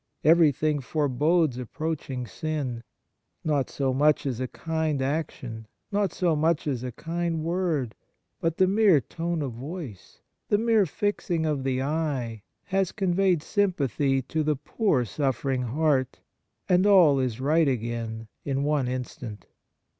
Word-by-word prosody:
Everything 155 -2 +4
forebodes 150 +1 +1
approaching 135 -1 -4
sin. 135 -1 -3 0.6
Not 145 -4 0
so 135 -2 -1
much 150 +3 +3
as 125 -4 -2
a 130 - -1
kind 160 0 -2
action, 130 -5 -3 0.2
not 200 -3 +1
so 170 -3 +1
much 160 +1 +1
as 135 -5 -1
a 125 - -4
kind 165 +3 -3
word, 165 -8 -1 0.5
but 165 0 -1
the 190 - +5
mere 195 -4 +5
tone 165 +5 -3
of 135 - -3
voice, 135 - -8 0.3
the 205 - +4
mere 220 -3 +3
fixing 175 -2 -1
of 150 -4 -1
the 130 -1 0
eye, 135 -7 -2 0.2
has 195 -2 0
conveyed 185 -4 +1
sympathy 140 - +1
to 155 +5 -2
the 150 0 +1
poor 145 - 0
suffering 135 +1 -1
heart, 130 +1 0 0.5
and 185 +2 +4
all 175 -9 +6
is 125 -3 -1
right 155 +4 +3
again 115 -3 -3 0.2
in 140 0 -1
one 145 -3 +1
instant. 125 -4 -5
150 Hz, 140 wpm, -26 LUFS, 130-165 Hz, 0.6 s, all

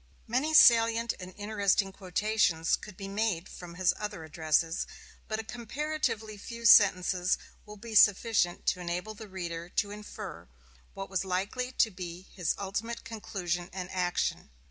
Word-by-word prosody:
Many 275 +7 0
salient 230 -2 +6
and 185 0 -8
interesting 205 -2 +1
quotations 190 -3 +1
could 210 -4 -12
be 195 - -6
made 195 -3 -1
from 175 -1 -10
his 185 0 +2
other 210 -5 -5
addresses, 160 +1 0 0.4
but 215 - -2
a 225 - -4
comparatively 235 -1 -3
few 235 +2 -8
sentences 185 -4 +5 0.3
will 210 0 -10
be 225 +2 -9
sufficient 205 -3 +4
to 180 - +1
enable 180 +4 -4
the 215 0 -10
reader 170 -2 -5
to 205 +2 -1
infer 210 - -8 0.5
what 195 0 -7
was 190 - 0
likely 195 +7 -2
to 225 - +3
be 180 -1 -7
his 180 -5 -1
ultimate 210 +4 -4
conclusion 180 -5 -4
and 185 -1 -6
action. 180 - -1
195 Hz, 145 wpm, -30 LUFS, 180-220 Hz, 0.5 s, salient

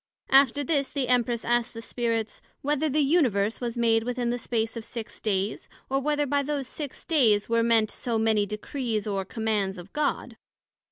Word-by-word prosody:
After 275 +1 +5
this, 280 -1 +1
the 265 -4 -2
Empress 240 -2 +1
asked 240 0 +1
the - - -5
Spirits, 230 -2 -2 0.2
Whether 295 +2 +1
the 300 +2 +2
Universe 245 - +2
was 240 -1 -3
made 225 -1 +3
within 245 0 -1
the 245 - -2
space 225 -1 -2
of 230 - -5
six 230 -1 -7
days, 200 -1 -1 0.2
or, 270 - +2
Whether 295 +1 0
by 285 +1 +1
those 280 -2 -2
six 290 -1 -6
days, 225 - +3
were 230 0 +2
meant 230 -2 +3
so 235 -2 -2
many 220 -2 +2
Decrees 215 +1 -3
or 200 -2 -1
Commands 210 -3 -1
of 175 +2 -11
God? 300 -1 -2
235 Hz, 180 wpm, -26 LUFS, 220-275 Hz, 0.2 s, After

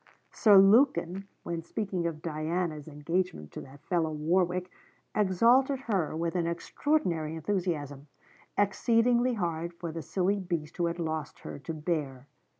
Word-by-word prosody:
Sir 210 -4 +6
Lukin, 195 -3 +4 0.2
when 170 -1 -3
speaking 180 0 -2
of 155 -2 -6
Diana's 160 -1 -2
'engagement 155 - -2
to - - -7
that 140 +2 -14
fellow 165 -2 0
Warwick,' 180 +4 0 0.4
exalted 235 +7 +3
her 195 - -1
with 170 +1 -2
an 170 -2 +1
extraordinary 170 - -1
enthusiasm, 160 -5 -2 0.5
exceedingly 235 +4 +3
hard 170 -3 -3
for 170 -1 -5
the 165 +1 -5
silly 190 +6 0
beast 170 -4 -4
who 175 - +1
had 170 0 -3
lost 160 -3 -4
her - - -7
to 140 +4 -6
bear. 150 -5 -3
170 Hz, 140 wpm, -29 LUFS, 155-195 Hz, 0.5 s, Sir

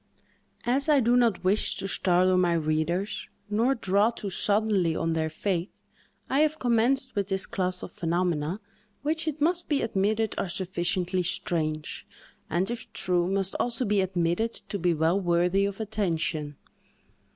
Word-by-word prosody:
As 270 +5 +2
I 295 -2 +6
do 240 0 +3
not 235 -7 +2
wish 195 +3 +2
to 195 - -2
startle 185 -1 +3
my 180 -2 +3
readers, 165 +4 -1 0.2
nor 235 +6 +2
draw 200 0 +2
too 210 -4 -6
suddenly 200 -4 +2
on 165 0 0
their 160 -1 0
faith, 175 +2 -2 0.6
I 270 - +1
have 310 0 +2
commenced 255 +1 +1
with 200 -2 -1
this 195 -1 0
class 185 -5 -1
of - - -7
phenomena, 170 -2 -1 0.5
which 320 +2 -1
it 310 -1 -2
must 345 +4 0
be 290 -3 +1
admitted 215 +1 0
are 190 - -2
sufficiently 180 0 -1
strange, 155 -3 -2 0.4
and, 180 +7 0
if 240 -1 -6
true, 180 -2 +1
must 195 0 +1
also 245 +1 0
be 205 -2 +2
admitted 185 +4 0 0.2
to 200 - -2
be 175 -1 +2
well 160 +5 +2
worthy 175 +2 +2
of 200 +1 -4
attention. 165 -8 -2
195 Hz, 155 wpm, -27 LUFS, 175-225 Hz, 0.6 s, I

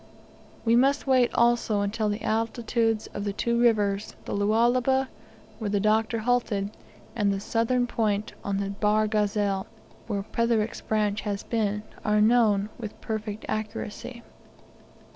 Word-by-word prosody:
We 230 0 +4
must 275 +4 +3
wait 255 -3 +4
also 235 -3 +3
until 210 +1 -1
the 205 +1 -3
altitudes 225 0 0
of 205 - -4
the 200 -1 -2
two 235 +3 0
rivers, 205 -4 +2
the - - -4
Lualaba, 240 +6 +2 0.5
where 215 -3 -2
the 205 0 +1
Doctor 220 +2 +2
halted, 220 -3 0 0.4
and 205 -3 +2
the 195 - -1
southern 230 +4 +1
point 215 -3 -1
on 200 -1 -1
the 200 0 -2
Bahr 210 +1 +2
Ghazal, 205 -2 0 0.4
where 200 -3 -2
Petherick 215 -2 0
has 200 -2 -3
been, 210 -2 -1 0.2
are 210 -1 +2
known 215 -2 +4
with 215 -3 -7
perfect 215 -1 -4
accuracy. 225 +3 -5
215 Hz, 135 wpm, -26 LUFS, 205-235 Hz, 0.5 s, We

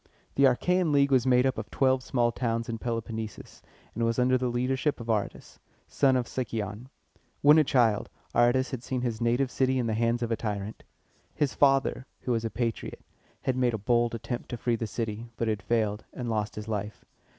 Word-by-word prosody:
The 140 - +4
Achæan 175 +6 +2
League 140 -1 +3
was 130 -1 +3
made 125 0 +4
up 130 - 0
of - - -7
twelve 130 -1 +2
small 120 -2 +1
towns 115 -1 -2
in 115 - -3
the 115 - -5
Peloponnesus, 115 -2 -5 0.3
and 115 - -2
was 115 0 +1
under 130 +1 +3
the 130 0 0
leadership 130 +4 0
of 115 0 -8
A - - +4
ra´tus, 105 -3 -3 0.4
a - - +6
native 130 -1 +4
of - - -8
Sic´y 115 -4 -3
on. 105 +6 -9 0.5
When 150 +2 +8
a - - +5
child, 120 -6 +2 0.2
Aratus 130 +3 +3
had 130 -3 -4
seen 125 +1 -3
his 120 -3 -2
native 120 +3 +1
city 130 0 +1
in 125 - 0
the 110 - 0
hands 115 +2 +1
of 115 - -2
a - - +3
tyrant. 105 -1 -4 0.5
His 145 -3 0
father, 135 -1 +2
who 125 - -2
was 115 -1 0
a 115 - -1
patriot, 115 -1 -3 0.4
had 130 - 0
made 125 -2 +1
a - - -2
bold 120 +3 +1
attempt 120 +2 -5
to 120 - -4
free 120 0 0
the 115 0 -3
city, 115 +1 -4
but 115 - -1
had 105 -2 -1
failed, 110 -1 0
and 125 - -5
lost 105 -1 -2
his 105 0 -6
life. 105 -1 -4
120 Hz, 215 wpm, -28 LUFS, 115-130 Hz, 0.5 s, When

